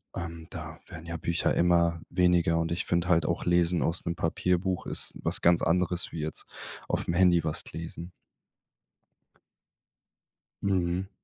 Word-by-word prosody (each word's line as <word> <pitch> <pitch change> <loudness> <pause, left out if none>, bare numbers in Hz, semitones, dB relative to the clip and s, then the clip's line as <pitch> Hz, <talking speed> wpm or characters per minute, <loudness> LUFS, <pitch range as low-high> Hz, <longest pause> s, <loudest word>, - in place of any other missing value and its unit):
Ähm, 85 -2 -6
da 80 -2 -8
werden 85 -3 -10
ja 85 0 -5
Bücher 85 +1 0
immer 85 -1 +2
weniger. 90 -2 +3
Und 80 0 -2
ich 85 - -1
finde 85 0 0
halt 85 -3 +3
auch, 85 - -1
lesen 85 -1 +3
aus 85 +2 0
'nem 85 0 -2
Papierbuch 90 +2 -1
ist - - 0
was - - +1
ganz 85 0 +4
anderes 90 +1 +1
wie 80 - -6
jetzt 75 0 -5 0.4
aufm 85 - -1
Handy 90 -1 +4
was 75 - -1
d - - -10
lesen. 85 +1 -7 2.5
Mhm. 95 -1 0
85 Hz, 150 wpm, -28 LUFS, 85-90 Hz, 2.5 s, ganz